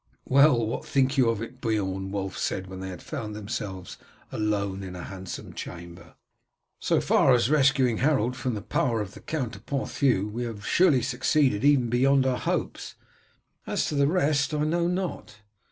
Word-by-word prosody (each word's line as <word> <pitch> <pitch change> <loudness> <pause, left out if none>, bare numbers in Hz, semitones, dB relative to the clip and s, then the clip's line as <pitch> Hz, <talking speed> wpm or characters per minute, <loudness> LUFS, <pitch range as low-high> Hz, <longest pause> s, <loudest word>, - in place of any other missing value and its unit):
"Well, 135 -3 +5
what 110 - -3
think 135 0 +1
you 130 -4 +4
of 115 -1 -1
it, 125 +3 -10
Beorn?" 95 -4 -1
Wulf 95 -2 -3
said, 95 - -2
when 95 0 -9
they 95 -1 -6
found 105 +4 -6
themselves 100 -3 -6 0.3
alone 100 -2 -1
in 95 -1 -7
a 90 - -7
handsome 95 -1 -8
chamber. 85 0 -9 0.6
"So - - +2
far 130 - +4
as 120 +2 +1
rescuing 135 -5 +3
Harold 125 -3 +1
from 125 -2 -2
the 105 - -6
power 115 0 0
of 100 -1 -6
the - - -11
Count 130 -7 -3
of - - -19
Ponthieu 130 -6 0
we 115 +3 -4
have 105 -3 -7
surely 155 -9 +4
succeeded 130 -1 +1
even 135 -5 +4
beyond 135 +2 +3
our 130 -1 0
hopes. - - -3 0.7
As - - 0
to - - -4
the 140 -1 +3
rest, 150 -3 +1
I 150 - 0
know 170 +3 +1
not. 180 - -3
120 Hz, 175 wpm, -26 LUFS, 100-140 Hz, 0.7 s, Well